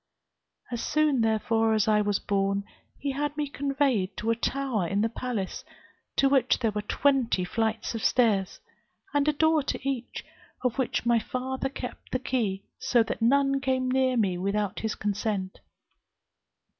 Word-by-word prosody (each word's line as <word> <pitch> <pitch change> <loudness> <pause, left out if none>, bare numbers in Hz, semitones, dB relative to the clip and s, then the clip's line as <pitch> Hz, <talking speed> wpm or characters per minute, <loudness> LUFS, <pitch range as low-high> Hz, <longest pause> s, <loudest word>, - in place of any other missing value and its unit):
As 240 -1 -2
soon 300 -4 +2
therefore 225 0 +2
as 215 -1 +2
I 210 -1 +4
was 205 -1 +1
born, 200 0 0 0.3
he 280 - -2
had 290 +2 -2
me 295 -1 -1
conveyed 270 -9 0
to 225 +2 0
a - - +2
tower 245 -6 -1
in 200 +4 0
the 225 - +2
palace, 225 -5 -4 0.5
to 275 - +4
which 270 -2 +3
there 225 -3 0
were 210 0 -2
twenty 245 -4 +1
flights 225 +4 -1
of 225 - -4
stairs, 210 -6 +2 0.5
and 290 0 +2
a - - +5
door 315 +1 +3
to 275 0 -4
each, 260 -3 -3 0.4
of 250 +1 0
which 255 -2 0
my 235 -1 +4
father 260 +3 -3
kept 255 -2 -8
the - - +1
key, 225 -7 -1 0.2
so 240 -2 +3
that 225 - -5
none 275 +3 +3
came 260 -1 0
near 260 -1 +2
me 190 -5 +1
without 200 +1 -1
his 220 -1 -2
consent. 205 -2 -2
235 Hz, 165 wpm, -27 LUFS, 210-270 Hz, 0.5 s, a